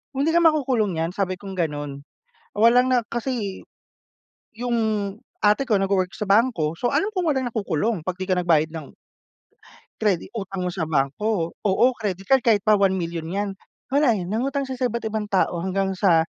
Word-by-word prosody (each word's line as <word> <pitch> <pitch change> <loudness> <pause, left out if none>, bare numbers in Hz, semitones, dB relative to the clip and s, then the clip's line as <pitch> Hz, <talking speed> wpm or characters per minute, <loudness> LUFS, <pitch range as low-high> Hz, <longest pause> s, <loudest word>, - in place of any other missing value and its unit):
"Hindi 290 +4 +1
ka 340 - +4
makukulong 265 - +2
niyan," 165 +2 -1
sabi 185 -1 -2
kong 195 +1 -9
ganon. 145 -5 -4 0.5
Wala 235 +4 +5
na 255 -1 +3
kasi 235 -5 -3 0.9
yung 240 +1 -2 0.7
ate 210 +6 +3
ko 215 - +3
nagwo-work 195 -1 0
sa - - -3
bangko 200 -6 +2
so, 245 - +1
alam 315 - +1
ko 380 - -3
walang 265 -3 +1
nakukulong 210 -1 -1
'pag 180 +3 -4
'di 185 0 -4
ka 180 - +2
nagbayad 160 -3 +2
ng 160 -4 -9 1.1
credit 200 -1 0
utang 195 -4 -4
mo 180 - -2
sa 160 -4 -3
bangko. 165 +6 0
Oo, 200 +4 +3
credit 195 -4 -4
card. 270 -1 +4
Kahit 220 -4 +2
pa 215 - +5
1 195 -2 +3
milyon 165 -2 -4
'yan. 200 +2 -2 0.4
Wala, 275 -7 +4
eh, 180 - -4
nangutang 265 +8 -1
siya 260 -1 -7
sa - - +3
iba't 235 0 -4
ibang 215 -1 -3
tao 180 -3 +1
hanggang 190 +1 -1
sa 170 -4 +3
200 Hz, 180 wpm, -23 LUFS, 180-235 Hz, 1.1 s, Wala